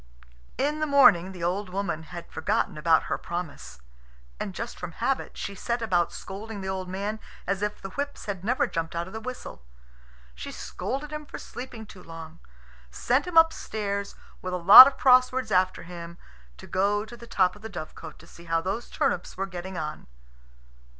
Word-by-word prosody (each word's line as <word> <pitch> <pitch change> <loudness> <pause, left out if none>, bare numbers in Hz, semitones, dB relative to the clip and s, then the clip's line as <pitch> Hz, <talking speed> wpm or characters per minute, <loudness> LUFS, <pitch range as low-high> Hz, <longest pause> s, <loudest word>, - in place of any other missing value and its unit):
In 295 +3 0
the 310 - 0
morning 250 - +6
the 180 -3 -8
old 185 +3 -1
woman 180 -4 -2
had 175 -1 -9
forgotten 160 - -1
about 160 +1 +3
her - - -3
promise. 140 - -6 0.6
And - - -4
just - - -6
from - - -6
habit, - - -2
she 200 - -4
set 235 +5 -2
about 180 -7 +1
scolding 205 +2 -7
the 190 - -5
old 190 -1 -3
man 200 +3 -3 0.3
as 195 +1 -1
if 210 0 -2
the 195 - -8
whips 285 +4 -4
had 195 -3 -4
never 245 +5 +2
jumped 165 0 -3
out 170 0 -1
of 190 - -11
the 220 - -4
whistle. 255 - -7 0.7
She - - -7
scolded 280 +3 -5
him 300 -1 -6
for - - -7
sleeping 245 -3 -8
too 195 -3 -13
long, 165 -1 -10 0.5
sent 250 - 0
him 350 -2 -2
upstairs, 210 -11 +2 0.3
with 185 0 -3
a - - 0
lot 195 +9 +12
of 275 - -2
cross 255 -1 +6
words 255 -4 -3
after 185 -1 +2
him, 170 0 -9 0.4
to - - -11
go 205 +3 +1
to 240 - -11
the 235 0 -13
top 185 -4 +2
of 210 - -15
the 220 - -7
dovecot 175 -6 -8
to 165 - -16
see 170 0 -15
how 165 0 +1
those 195 +8 -4
turnips 180 - -1
were 195 - -1
getting 185 -1 -7
on. 155 -1 -5
195 Hz, 190 wpm, -27 LUFS, 175-235 Hz, 0.7 s, lot